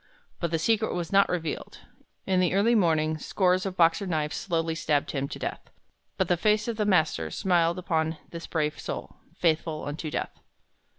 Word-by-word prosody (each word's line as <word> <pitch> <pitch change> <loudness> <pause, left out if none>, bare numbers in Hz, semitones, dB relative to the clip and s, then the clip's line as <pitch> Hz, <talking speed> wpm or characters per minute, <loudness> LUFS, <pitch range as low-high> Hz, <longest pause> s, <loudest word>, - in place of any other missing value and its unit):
But 170 - -1
the 165 - 0
secret 220 +6 +1
was 175 -2 -3
not 200 0 +5
revealed. 165 -4 -4 0.4
In 190 -1 +2
the 180 0 +2
early 215 +4 +4
morning 160 -6 +2
scores 185 +3 +1
of 190 -1 -6
Boxer 170 +4 +3
knives 155 -3 -1
slowly 165 -3 -1
stabbed 150 -3 0
him 140 -1 -2
to - - -7
death. - - -5 0.5
But - - +1
the 175 - +2
face 210 +4 +2
of 230 -2 -2
the 210 -1 0
Master 155 - +2
smiled 170 - +1
upon 160 -3 -1
this 170 -1 -7
brave 150 -2 -1
soul, - - -6 0.2
"faithful 160 -2 0
unto 155 +2 -4
death." - - -4
170 Hz, 180 wpm, -27 LUFS, 160-190 Hz, 0.5 s, not